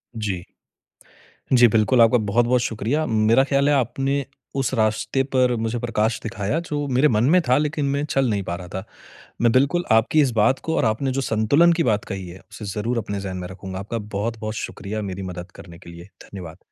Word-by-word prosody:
जी। 100 -5 -3 1.1
जी, 125 -1 +7
बिल्कुल, 110 +3 +3
आपका 115 +2 +6
बहुत-बहुत 120 +3 +2
शुक्रिया, 120 +8 -1
मेरा 110 +1 +3
ख्याल 140 +1 +3
है 145 - +4
आपने 135 +2 0 0.3
उस 135 -1 0
रास्ते 110 +4 +1
पर 125 -1 +3
मुझे 115 +1 -2
प्रकाश 115 -1 0
दिखाया 105 +6 -2
जो 145 -1 -2
मेरे 130 +3 +3
मन 110 -4 +2
में - - +6
था 125 +1 +4
लेकिन 150 -1 -1
मैं 140 +1 0
चल 135 -3 +1
नहीं 100 -2 -1
पा 85 - -4
रहा 90 0 -9
था। 95 - -4 0.6
मैं 120 -1 +4
बिल्कुल 140 +8 +2
आपकी 115 +8 +4
इस 135 -4 +2
बात 130 +5 +3
को 160 - -1
और - - +2
आपने 120 +5 0
जो 135 - -1
संतुलन 135 +9 +3
की 165 - +1
बात 110 -4 0
कही 95 -2 -6
है, 90 +2 -11
उसे 105 - -8
ज़रूर 105 +5 -2
अपने 100 -3 -3
जहन 95 -1 -5
में 90 - -5
रखूँगा। 95 0 -7
आपका 105 +4 -4
बहुत-बहुत 110 +1 -4
शुक्रिया 110 0 -5
मेरी 100 -2 -5
मदद 90 +1 -8
करने 85 -2 -12
के 90 - -13
लिए। 85 +2 -12
धन्यवाद। 90 -3 -10
115 Hz, 205 wpm, -22 LUFS, 100-135 Hz, 1.1 s, जी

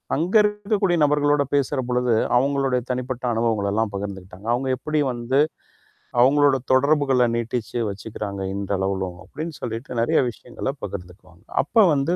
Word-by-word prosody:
அங்க. 170 +8 -1
இருக்கக்கூடிய 210 -3 +1
நபர்களோட 145 0 +3
பேசற 140 0 +1
பொழுது, 125 -1 +1 0.2
அவுங்களுடைய 135 -1 +1
தனிப்பட்ட 125 0 -3
அனுபவங்கள 110 -3 0
எல்லாம் 110 0 0
பகிர்ந்துக்கிட்டாங்க. 95 0 -7
அவுங்க 130 +2 -1
எப்பிடி 150 +4 -1
வந்து, 120 +3 0 0.8
அவுங்களோட 140 +1 +5 0.2
தொடர்புகள 135 -2 +3
நீட்டிச்சு 120 0 -3
வச்சுக்கிறாங்க 100 -1 -6
இன்றளவுலும், 95 -2 -2
அப்பிடின்னு 155 - -7
சொல்லிட்டு 115 +2 -4
நிறைய 155 +7 +3
விஷயங்கள 120 +3 -6
பகிர்ந்துக்குவாங்க. 90 -2 -9 0.2
அப்ப 215 - +4
வந்து 140 +6 +1
125 Hz, 125 wpm, -23 LUFS, 105-145 Hz, 0.8 s, அவுங்களோட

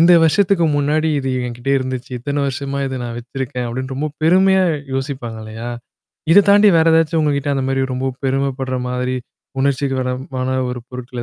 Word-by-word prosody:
இந்த 170 +2 +7
வருஷத்துக்கு 175 +1 +3
முன்னாடி 150 +2 +1
இது 135 -1 -3 0.2
எங்கிட்ட 120 +2 -4
இருந்துச்சு. 130 0 -5
இத்தன 140 +4 -2
வருஷமா 140 +1 -3
இத 130 -1 -4
நான் 120 -1 -5
வச்சிருக்கேன். 125 0 -4
அப்டின்னு 130 +3 -4
ரொம்ப 150 +3 -2
பெருமையா 190 +3 +4 0.3
யோசிப்பாங்க 130 -4 -4
இல்லையா? 110 +2 -7 0.6
இத 200 +4 +8
தாண்டி 205 +1 +7
வேற 160 - +4
ஏதாச்சும் 165 0 +2
உங்ககிட்ட 145 -1 0
அந்த 135 -1 -1
மாரி 135 0 +1
ரொம்ப 130 +1 -2
பெருமைப்படுற 135 -1 -1
மாதிரி 125 0 -1 0.4
உணர்ச்சிக்கு 135 0 +1
வரமான 130 0 -2
ஒரு 125 -1 -6
பொருட்கள் 125 -1 -6
135 Hz, 160 wpm, -19 LUFS, 125-150 Hz, 0.6 s, இத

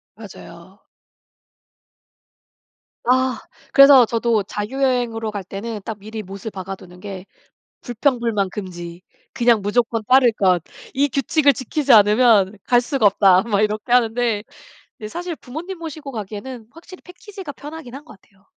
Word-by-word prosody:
맞아요. 190 -3 -13 2.3
아 255 -1 +2 0.3
그래서 275 -2 +8
저도 230 -2 0
자유여행으로 230 +1 -2
갈 205 -2 -5
때는 210 +4 -6
딱 220 - -5
미리 215 +2 -7
못을 200 +2 -8
박아두는 185 -2 -9
게 195 -1 -8 0.6
"불평불만 235 -5 -1
금지. 175 -3 -8 0.3
그냥 240 -4 +3
무조건 225 +2 0
따를 255 -2 +5
것. 185 -6 +1 0.3
이 280 +1 +1
규칙을 280 +2 +2
지키지 270 +2 0
않으면 210 -1 +5
갈 245 -1 +3
수가 260 -2 -1
없다." 190 -2 +4
막 210 -3 0
이렇게 215 +3 -2
하는데 230 -3 +2 0.7
사실 345 +4 -5
부모님 335 +8 -8
모시고 310 -3 -7
가기에는 220 +2 -7
확실히 345 +4 -14
패키지가 370 -3 -10
편하긴 295 -3 -10
한 280 - -10
것 215 -10 -15
같아요. 195 0 -30
230 Hz, 295 characters per minute, -20 LUFS, 205-265 Hz, 2.3 s, 그래서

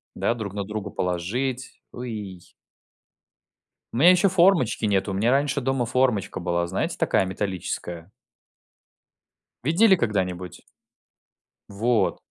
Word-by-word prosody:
да, - - 0
друг 110 -5 -6
на 100 0 -3
друга 105 0 -5
положить. 115 +11 -3
Ой. 105 -7 -7 1.5
У 115 - -3
меня 175 +7 +7
ещё 185 +2 +4
формочки 170 - +3
нету, 100 -1 +1
у - - -3
меня 110 +5 +2
раньше 140 +1 +1
дома 135 -1 0
формочка 125 -6 0
была, 85 -1 -1
знаете, 95 - -2
такая - - +2
металлическая? 95 -2 -4 1.5
Видели 190 - +4
когда-нибудь? 90 - -2 1.1
Вот. 110 +3 +1
110 Hz, 110 wpm, -24 LUFS, 95-130 Hz, 1.5 s, меня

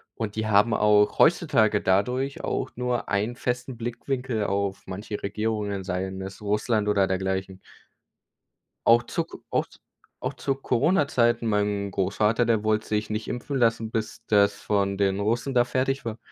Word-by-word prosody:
Und 110 -2 -4
die 110 0 -2
haben 105 +2 +4
auch 105 -1 +3
heutzutage 115 -11 +4
dadurch 125 +10 0
auch - - -2
nur 125 0 -2
einen 105 +4 -1
festen 125 0 -3
Blickwinkel 120 -1 -3
auf 100 -1 -1
manche 100 +3 -6
Regierungen, 105 -1 -2
seien 95 0 -3
es 95 +1 -8
Russland 105 +1 0
oder 100 -2 +3
dergleichen. 95 0 -2 1.3
Auch 120 +1 +6
zu - - -2
k - - -11
auch - - +1
z - - -20 0.4
auch - - -2
zu 135 - -1
Corona-Zeiten, 125 -4 +1
mein 105 -1 0
Großvater, 105 +5 +1
der 110 -2 +1
wollte 110 0 0
sich 105 0 -1
nicht 110 +1 -3
impfen 135 +3 -3
lassen, 115 -2 +1
bis 110 -1 -4
das 100 -1 +4
von 100 -1 -1
den 100 -1 +1
Russen 115 +6 -1
da 120 0 +5
fertig 135 +1 -1
war. 115 -1 -4
110 Hz, 160 wpm, -25 LUFS, 100-120 Hz, 1.3 s, Auch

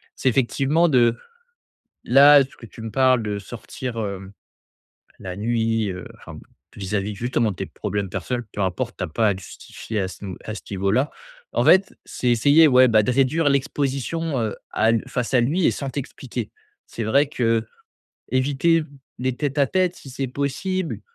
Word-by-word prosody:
c'est 130 - +1
effectivement 135 +6 +2
de 120 -4 +3 0.9
Là, 140 +2 +8
ce 130 - -16
que 115 - -12
tu 110 - -12
me 115 - -5
parles 130 -2 +4
de 105 -1 -3
sortir, 120 +3 -7
heu, 100 -2 -5 0.9
la 90 -1 -7
nuit 115 0 0
heu, 90 -1 -6
enfin - - -11
bon, - - -11 0.3
vis-à-vis 100 +1 -3
justement 120 0 0
de 95 - -5
tes - - -4
problèmes 100 -2 -4
personnels, 125 +3 -3
peu 100 - -3
importe, 105 +7 -2
tu - - -3
as - - -2
pas 110 +8 +1
à - - +2
te 95 - -9
justifier 110 +3 -7
à 95 - -1
ce 95 +2 -11
nou 95 -2 -5
à 110 - -4
ce 105 - -7
niveau-là. 100 +8 0 0.4
En - - +1
fait, 190 +1 +5
c'est 125 - -2
essayer, 145 +7 +5
ouais, 130 -2 +6
bah, 110 -2 +4
de 125 - 0
réduire 140 +4 +2
l'exposition, 140 +2 -1
heu, 110 -2 -2 0.2
à 110 - +2
l 115 -1 0
face 125 +1 -3
à 125 - +5
lui 155 +9 +1
et - - +4
sans 140 - -4
t'expliquer. 125 -4 -6 0.3
C'est 115 - -6
vrai 140 +7 +3
que 115 -5 0 0.7
éviter 140 +6 +2 0.4
les 130 0 -1
tête-à-tête, 155 +6 0
si 135 - -12
c'est 135 +1 -3
possible, 160 +7 -2
125 Hz, 180 wpm, -22 LUFS, 110-140 Hz, 0.9 s, Là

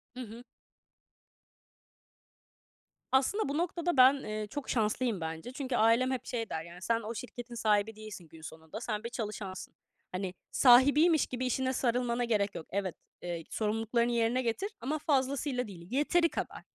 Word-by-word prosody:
Hı - - -7
hı. 230 0 -9 2.7
Aslında 275 +8 +2
bu 285 - -1
noktada 345 -1 -1
ben, 255 +1 +9
eee, 215 0 -4
çok 285 +4 -6
şanslıyım 225 -2 0
bence. 160 +7 -5
Çünkü 260 -1 -3
ailem 235 +3 +4
hep 260 -3 -3
şey 230 -3 -3
der 160 - -3
yani, 170 +2 -12
"Sen 230 +4 +1
o 225 +1 -5
şirketin 245 0 -7
sahibi 215 -1 +1
değilsin 215 -5 -9
gün 160 0 -15
sonunda, 160 +6 -9
sen 215 -2 -3
bir 235 - -4
çalışansın. 210 -5 -5 0.4
Hani, 185 0 -3 0.2
sahibiymiş 285 +6 +6
gibi 255 0 -3
işine 260 +1 0
sarılmana 245 -1 0
gerek 210 -4 +1
yok. 160 - -6
Evet, 190 -2 -2 0.3
eee, 170 -2 -4
sorumluluklarını 225 +2 0
yerine 235 +2 +2
getir 255 - -1
ama 300 +4 -1
fazlasıyla 270 -3 0
değil, 175 -4 -11
yeteri 335 +6 +3
kadar. - - -5
235 Hz, 155 wpm, -31 LUFS, 210-260 Hz, 2.7 s, ben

